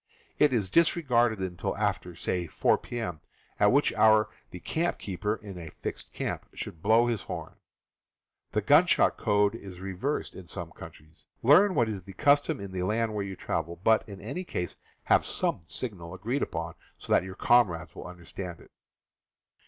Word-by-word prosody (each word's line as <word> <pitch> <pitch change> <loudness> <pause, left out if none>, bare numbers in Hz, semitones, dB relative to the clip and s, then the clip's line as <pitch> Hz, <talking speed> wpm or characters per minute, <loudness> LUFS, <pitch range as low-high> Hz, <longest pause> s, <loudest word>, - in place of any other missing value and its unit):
It 150 -2 +5
is 105 -7 0
disregarded 125 -9 +3
until 90 -3 -3
after, 90 -1 -1
say, 90 +1 -2
4 - - +2
p.m., 90 -10 -5 0.4
at - - +5
which - - +3
hour 110 -1 +5 0.2
the 90 - -9
campkeeper 105 - -2
(in 95 -3 -8
a 80 -2 -7
fixed - - -6
camp) - - -4
should 80 - -6
blow 110 +4 +5
his 120 -3 -1
horn. - - -6 1.0
This 105 -1 -1
gunshot 155 +7 +5
code 105 -2 +2
is 95 -5 -9
reversed 95 +10 -3
in 95 -2 -11
some - - -5
countries. 80 +2 -14 0.2
Learn 180 - +6
what 120 - +3
is 105 -3 -4
the 95 +2 -12
custom 145 - +3
in 100 -1 -7
the 95 -1 -3
land 110 +4 0
where 105 -1 -1
you 95 -1 -5
travel; 85 -1 -3
but, 110 +5 +3
in 100 -1 -8
any 140 - -5
case, 90 - -4 0.3
have - - +4
some - - -1
signal 85 - -6
agreed 115 +9 -2
upon 85 0 -3 0.2
so - - -2
that - - +5
your 95 0 -8
comrades 90 -10 +3
will - - -8
understand 90 0 -8
it. - - -18
100 Hz, 170 wpm, -28 LUFS, 90-120 Hz, 1.0 s, Learn